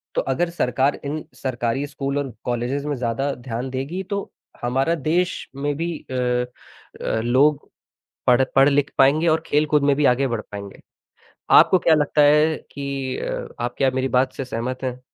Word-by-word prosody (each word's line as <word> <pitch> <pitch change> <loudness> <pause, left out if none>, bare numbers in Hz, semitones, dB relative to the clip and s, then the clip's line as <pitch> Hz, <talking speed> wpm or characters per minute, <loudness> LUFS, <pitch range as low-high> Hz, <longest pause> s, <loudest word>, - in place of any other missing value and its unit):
तो - - +2
अगर 175 - -1
सरकार 135 -4 0
इन 150 +2 -3
सरकारी 125 +1 -2
स्कूल 140 -1 -3
और 140 -3 -2
कॉलेजेज़ 125 +4 -2
में 145 - -1
ज़्यादा 130 +3 -1
ध्यान 120 +1 -5
देगी, 135 +9 -4
तो 200 +1 -4 0.3
हमारा 135 +7 +1
देश 170 +4 -1
में 145 +1 -2
भी 165 0 -2
अ - - -4 0.9
अ, 110 - -1
लोग 140 +5 +2 0.6
पढ़ 125 +1 +5
पढ़ 135 +1 +7
लिख 145 0 +1
पाएँगे 150 +5 +4
और 160 0 +2
खेल 150 +1 +2
कुद 150 -1 +2
में 140 0 +4
भी 150 - +1
आगे 135 +2 0
बढ़ 115 -3 -2
पाएँगे। 100 -1 -8 0.8
आपको 185 - +7
क्या 165 -2 +4
लगता 150 0 +2
है 150 +2 +5 0.2
कि 140 -2 -4
अ, - - -4
आप 120 0 -3
क्या 135 -1 +2
मेरी 130 +1 -1
बात 130 0 0
से 135 - -5
सहमत 125 +2 -4
हैं? 125 -1 -3
140 Hz, 180 wpm, -22 LUFS, 130-150 Hz, 0.9 s, पढ़